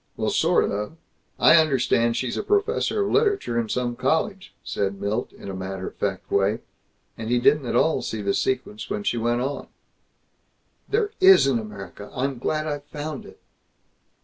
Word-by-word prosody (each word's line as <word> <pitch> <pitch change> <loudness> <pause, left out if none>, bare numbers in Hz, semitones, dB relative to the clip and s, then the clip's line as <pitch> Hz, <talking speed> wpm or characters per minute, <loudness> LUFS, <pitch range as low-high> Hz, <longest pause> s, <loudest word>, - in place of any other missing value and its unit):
Well, - - 0
sort - - +2
of. 105 +10 -4 0.4
I 165 - +7
understand 125 -6 +2
she's 120 0 -2
professor 415 +1 +1
of - - -2
literature 410 - +2
in 115 -2 -2
some 120 0 -1
college," 185 - -1
said 100 -1 -2
Milt, 105 +4 -2
in - - -12
a 100 - -4
matter 95 0 -5
of - - -24
fact 95 -2 -3
way. 100 +3 +2 0.6
And 110 0 -4
he 120 - +3
didn't 140 +2 +3
at 120 - -1
all 160 +6 +3
see 110 -2 -4
the 100 0 +1
sequence 115 -5 -2
when 105 - -3
she 120 - 0
went 120 +1 0
on: 140 +3 -3 1.2
"There 420 -1 +1
is 380 0 +8
an 130 -4 +2
America! 100 -2 -9
I'm 135 -1 -2
glad 155 +4 -1
I've 145 -2 -4
found 150 -1 -6
it!" - - -15
120 Hz, 175 wpm, -24 LUFS, 105-155 Hz, 1.2 s, is